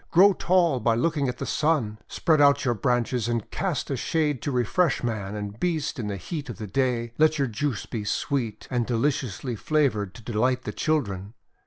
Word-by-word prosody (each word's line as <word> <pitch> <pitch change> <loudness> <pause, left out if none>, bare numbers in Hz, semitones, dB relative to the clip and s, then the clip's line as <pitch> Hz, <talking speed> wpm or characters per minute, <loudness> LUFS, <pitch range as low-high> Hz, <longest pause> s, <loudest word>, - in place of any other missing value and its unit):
Grow 195 +4 +6
tall 175 -7 +2
by 115 0 +2
looking 140 +2 +1
at 125 - -4
the - - -4
Sun. 135 -9 0
Spread 155 -3 +2
out 140 0 +5
your 120 - +3
branches 120 +1 0
and 115 -3 -2
cast 175 -8 -2
a - - +1
shade 150 -1 0
to 145 - -2
refresh 135 +7 +1
man 105 -4 -3
and 105 +1 -6
beast 160 -5 -1
in 110 - -3
the 100 -1 -3
heat 145 - -6
of 115 - -6
the 110 - -5
day. 120 +1 -1
Let 155 0 +4
your 140 -2 +1
juice 120 +1 -2
be 110 -3 -4
sweet 115 0 -2
and 120 -2 0
deliciously 125 -1 -1
flavoured 110 -9 0
to 115 - -12
delight 125 +3 0
the - - -5
children. 105 -9 -1
125 Hz, 195 wpm, -26 LUFS, 110-150 Hz, -, Grow